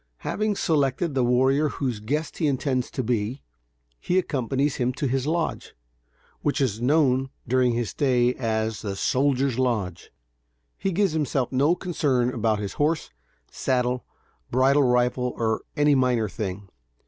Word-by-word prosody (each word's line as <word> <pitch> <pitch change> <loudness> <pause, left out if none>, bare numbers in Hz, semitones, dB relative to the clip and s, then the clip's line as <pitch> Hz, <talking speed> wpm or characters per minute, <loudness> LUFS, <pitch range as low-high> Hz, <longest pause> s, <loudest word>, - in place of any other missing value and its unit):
Having 215 0 0
selected 150 -1 0
the 130 -2 +1
warrior 130 +5 +3
whose 125 -7 -3
guest 150 +9 -3
he 160 - +2
intends 130 -2 0
to 130 - -3
be, 120 +2 -2 0.6
he 180 - 0
accompanies 140 -4 0
him 125 0 +1
to 140 - -3
his 135 +2 -1
lodge, 165 +1 -2 0.7
which 145 - 0
is 115 -5 0
known 135 -1 +2 0.2
during 125 0 +2
his 120 -2 -2
stay 125 -3 +2
as 110 -3 -2
the 100 -3 -4
"soldiers' 130 +2 +1
lodge." 110 -9 -1 0.7
He 195 - -2
gives 195 +1 +2
himself 145 -5 -1
no 140 +6 +3
concern 140 -9 0
about 110 -2 +1
his 100 -1 -4
horse, 155 - 0 0.4
saddle, 125 -1 0 0.5
bridle 135 +3 +4
rifle 125 -1 +1
or 110 -1 0 0.2
any 145 0 +4
minor 125 -4 +2
thing. 100 -1 -5
130 Hz, 145 wpm, -25 LUFS, 120-145 Hz, 0.7 s, bridle